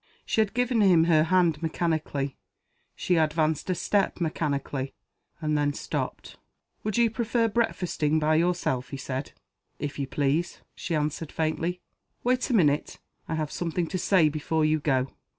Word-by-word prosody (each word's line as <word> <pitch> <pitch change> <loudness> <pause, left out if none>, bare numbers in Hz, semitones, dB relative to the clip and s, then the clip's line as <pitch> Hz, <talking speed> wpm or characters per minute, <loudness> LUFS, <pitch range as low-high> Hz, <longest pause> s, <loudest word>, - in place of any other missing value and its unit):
She 220 - +2
had 215 0 -1
given 245 -2 +2
him 180 -5 +6
her 160 -2 +4
hand 170 -3 +2
mechanically; 155 -4 -1 0.6
she 180 - +1
advanced 155 0 +1
a 185 - +2
step 195 +3 0
mechanically 140 -4 -2 0.4
and 155 -2 0
then 145 -1 +1
stopped. - - -4 0.5
"Would 215 +1 -1
you 235 -2 +4
prefer 230 0 +1
breakfasting 180 -9 0
by 155 0 +2
yourself?" 165 -7 0
he 140 - -5
said. 135 +1 -5 0.4
"If 145 0 -5
you 140 - -1
please," 145 +5 -1
she 170 - -3
answered, 155 +1 -2
faintly. 165 +3 -1 0.4
"Wait 255 +2 +1
a - - +1
minute. 150 -7 +2 0.3
I 160 - -2
have 155 -2 -2
something 175 0 -1
to 185 - -2
say 180 -3 +4
before 155 +1 0
you 155 0 +2
go." 135 -3 0
160 Hz, 155 wpm, -27 LUFS, 150-180 Hz, 0.6 s, him